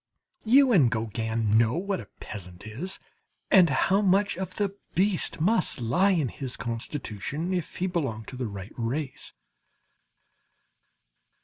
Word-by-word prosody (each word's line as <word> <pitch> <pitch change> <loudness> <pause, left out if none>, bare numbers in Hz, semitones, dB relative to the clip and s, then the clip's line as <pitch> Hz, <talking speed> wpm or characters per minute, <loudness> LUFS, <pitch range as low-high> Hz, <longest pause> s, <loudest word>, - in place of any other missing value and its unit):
You 260 +3 +6
and 155 - +5
Gauguin 110 -1 0
know 115 +5 +2
what 195 +2 -1
a 105 - -9
peasant 90 -2 -9
is, 145 - -4 0.5
and 185 -4 +7
how 190 +9 +3
much 200 +1 +3
of 185 0 -5
the 200 -2 -1 0.2
beast 190 -2 +2
must 185 - +2
lie 170 - +2
in 160 -9 +2
his 130 0 -5
constitution 125 - -4
if 175 -4 -3
he 180 - -1
belong 140 -12 -2
to - - -9
the 125 -2 -3
right 100 -1 -8
race. 130 +5 -3
150 Hz, 135 wpm, -27 LUFS, 115-190 Hz, 0.5 s, and